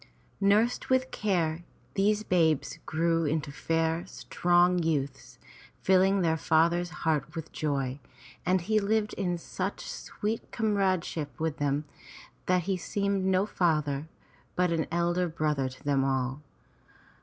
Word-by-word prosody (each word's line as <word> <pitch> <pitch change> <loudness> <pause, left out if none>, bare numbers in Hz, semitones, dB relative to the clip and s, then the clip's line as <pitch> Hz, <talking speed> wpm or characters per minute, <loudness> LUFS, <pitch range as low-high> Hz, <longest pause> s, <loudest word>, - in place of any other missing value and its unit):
Nursed 210 +4 +2
with 260 0 +2
care, 175 -5 0 0.3
these 210 +2 +2
babes 165 -7 +1
grew 165 +1 +1
into 150 -1 -1
fair, 165 +3 0
strong 175 0 +2
youths, 140 -5 -2 0.5
filling 190 +1 +4
their 160 -2 +2
father's 170 +3 +2 0.2
heart 155 -1 0
with 160 -2 -6
joy, 140 -3 -2 0.4
and 185 0 +2
he 215 +5 +2
lived 210 +1 0
in 180 -3 -1
such 185 +3 -4
sweet 215 +2 -4
comradeship 185 - 0
with 160 -1 -1
them 145 +1 0 0.6
that 180 -1 +3
he 190 +2 -1
seemed 200 +1 -1
no 190 +1 +3
father 155 -7 0 0.5
but 180 -1 +2
an 165 -2 0
elder 175 +1 +1
brother 150 -5 -1
to 130 - -14
them 140 -2 +2
all. 130 +1 -1
170 Hz, 130 wpm, -29 LUFS, 155-190 Hz, 0.6 s, filling